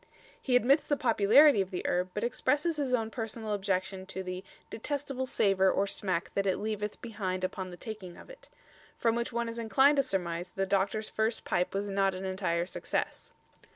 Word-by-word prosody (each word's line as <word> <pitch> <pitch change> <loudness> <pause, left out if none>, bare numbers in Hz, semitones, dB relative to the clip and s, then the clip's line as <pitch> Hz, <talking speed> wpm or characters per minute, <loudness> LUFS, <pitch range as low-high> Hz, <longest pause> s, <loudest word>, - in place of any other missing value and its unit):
He 255 - +1
admits 270 +5 +4
the 290 - +1
popularity 235 +1 +6
of 190 - -3
the 185 - -4
herb, 180 +1 0
but 210 - -2
expresses 295 +7 0
his 280 -3 -1
own 225 -3 0
personal 220 0 -4
objection 190 -1 -2
to 190 0 -5
the 185 0 -5 0.3
"detestable 270 +2 -3
savour 195 -5 +3
or 195 - +2
smack 190 -3 -3
that 200 0 0
it 190 - +2
leaveth 210 -1 -3
behind 190 -5 -3
upon 185 0 -3
the 175 - -10
taking 195 -4 -7
of - - -13
it"; - - -14 0.5
from 230 -1 +2
which 235 +1 -2
one 235 0 -1
is 230 0 -5
inclined 270 +6 +4
to - - +6
surmise 175 -8 -2
that - - -30
the 195 - 0
doctor's 200 +2 0
first 220 +1 -1
pipe 180 +2 0
was 200 +1 -1
not 195 -1 +1
an 185 +1 -5
entire 185 -3 -1
success. 185 - -3
205 Hz, 195 wpm, -30 LUFS, 190-235 Hz, 0.5 s, popularity